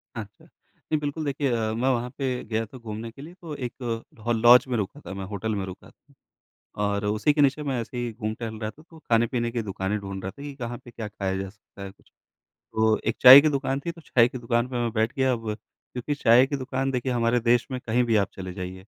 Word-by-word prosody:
अच्छा। 105 -3 -9
नहीं 155 - -6
बिल्कुल 150 +1 -3
देखिए 140 -1 0
अ, 110 -2 0
मैं 125 +4 +1
वहाँ 125 -1 0
पे 130 -3 -2
गया 110 0 -2
था 120 +4 -12
घूमने 115 -1 -7
के 135 - -13
लिए 160 +4 -10
तो 160 -4 -6
एक 125 -1 -6 0.4
अ, - - +2
लॉज 120 +2 +7
में 125 -2 -1
रुका 105 +7 -3
था - - -6
मैं 95 0 -5
होटल 105 +2 -3
में 100 -1 -2
रुका। 95 -1 -11 0.9
और 100 0 0
उसी 105 +7 +2
के 145 - 0
नीचे 140 +1 +3
मैं 135 -4 -1
ऐसे 115 +2 -7
ही 120 -1 -2
घूम-टहल 110 0 -5
रहा 110 -1 -2
था 155 - -18
तो 165 - -14
खाने-पीने 120 -3 +1
की 120 -1 -1
दुकानें 95 0 -2
ढूँढ 95 -1 -6
रहा 95 - -3
था 140 - -13
कि 145 -1 -7
कहाँ 120 -2 -5
पे 120 - -11
क्या 115 -2 -6
खाया 95 -2 -3
जा 95 0 -4
सकता 105 0 -15
है 100 - -7
कुछ। 100 - -24 0.6
तो 110 0 +3
1 115 - 0
चाय 130 +2 +12
की 155 - +2
दुकान 135 -1 -1
थी 170 - -1
तो 165 - -14
चाय 120 -6 +3
की 130 - -7
दुकान 120 0 0
पे 130 - -5
मैं 120 - 0
बैठ 110 0 +1
गया। 130 -1 +2
अब 115 -3 -3
क्योंकि 125 +5 -7
चाय 125 -2 +5
की 140 - -2
दुकान 135 0 -2
देखिए 125 0 -1
हमारे 120 0 +2
देश 120 +1 +3
में 130 -1 -3
कहीं 120 +1 +1
भी 115 -2 +2
आप 100 -2 +2
चले 95 -1 -6
जाइए 90 +1 -7
120 Hz, 245 wpm, -25 LUFS, 110-130 Hz, 0.9 s, चाय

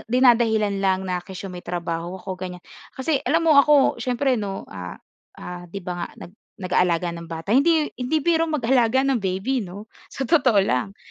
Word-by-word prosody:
dinadahilan 225 -5 +3
lang 190 -1 +1
na 180 -1 -2
kesyo 190 +1 -8
may 180 - -7
trabaho 170 0 -4
ako, 185 -1 -7
ganyan. 180 -1 -7 0.3
Kasi 270 +2 0
alam 330 +4 +2
mo 320 - +5
ako 285 -1 +3
siyempre 255 -1 0
'no, 195 -2 -5
ah, 90 -1 -7 0.4
ah, 175 0 -8
'di 195 +2 -8
ba 180 - -3
nga - - -9 0.2
nag 175 - -13 0.3
nag-aalaga 180 -2 +1
ng 170 0 -9
bata 165 +6 -2
hindi 305 +3 +4
hindi 255 +6 +1
biro 330 -1 +2
mag-alaga 260 -3 +2
ng 270 -3 +1
baby, 195 +7 -1
'no, 200 0 -8 0.2
sa 270 - -4
totoo 255 -6 +3
lang. 160 +10 -1
205 Hz, 180 wpm, -23 LUFS, 180-265 Hz, 0.4 s, mo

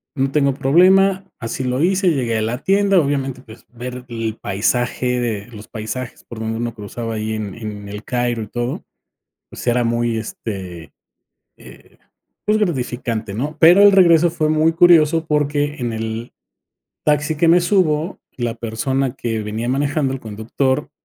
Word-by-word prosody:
no 135 -1 0
tengo 140 -1 +2
problema", 185 +8 +4 0.2
así 115 +2 -4
lo 125 +1 -1
hice, 190 +2 +2
y 170 - +3
llegué 120 -4 0
a - - -1
la 115 +3 -1
tienda, 195 +2 +3
obviamente, 135 -4 -1
pues, 110 -2 -15
ver 125 +1 -7
el 115 -2 -3
paisaje, 120 +5 0
de 110 -4 -2
los 110 -3 -11
paisajes 115 +3 -6
por 115 - -9
donde 110 0 -3
uno 120 0 -3
cruzaba 115 +2 -5
ahí 110 0 -3
en 105 -3 -4
en 105 -3 -7
El 105 +1 -7
Cairo 120 -2 -1
y - - -9
todo, 120 +4 -4 0.7
pues, - - -9
era 120 0 +3
muy, 120 0 0
este, 95 -7 -6 0.7
eh, - - -16 0.5
pues 210 +1 +2
gratificante, 120 - -2
¿no?, 145 +8 -3
pero 175 +6 +7
el 205 0 +8
regreso 170 -3 +5
fue 160 -2 -1
muy 155 +1 +3
curioso 165 -2 +5
porque 145 -1 0
en 120 -3 -2
el 110 +1 -5 0.7
taxi 150 +1 +1
que 165 +2 +3
me 175 +2 +6
subo, 175 -2 +1 0.2
la 120 -2 -2
persona 120 +3 -2
que 115 -2 -3
venía 110 +3 -4
manejando, 140 +1 0
el 135 - -6
conductor, 130 +6 -2
125 Hz, 165 wpm, -19 LUFS, 115-155 Hz, 0.7 s, el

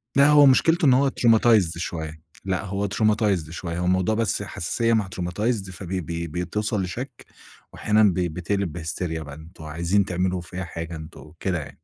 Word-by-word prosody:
لأ 140 +1 +6
هو 145 -1 +7
مشكلته 165 +5 +4
إن 130 - +6
هو 135 +1 +4
traumatized 110 -8 +3
شوية 80 -2 -5 0.2
لأ 95 -1 -1
هو 100 +1 -2
traumatized 105 -5 +1
شوية 85 0 -5
هو 90 - -1
الموضوع 95 +4 +2
بس 110 -2 0
حساسيّة 115 +5 -1
مع 105 -4 +1
traumatized 95 +3 -2
فبي 95 0 -4
بي 85 +1 -4
بتوْصل 95 +6 -2
لشَك، 120 +8 -6 0.5
وأحيانًا 105 +1 +2
بي 90 -3 +2
بتقلب 90 +2 -2
بهستريا 80 0 -4
بان 80 +3 -11
وعايزين 85 +6 0
تعملوا 90 0 -1
فيّا 90 +2 -6
حاجة 85 0 -6
أنتم 80 +1 -10
وكده 85 +3 -4
يعني. 70 -3 -10
95 Hz, 165 wpm, -24 LUFS, 85-105 Hz, 0.5 s, هو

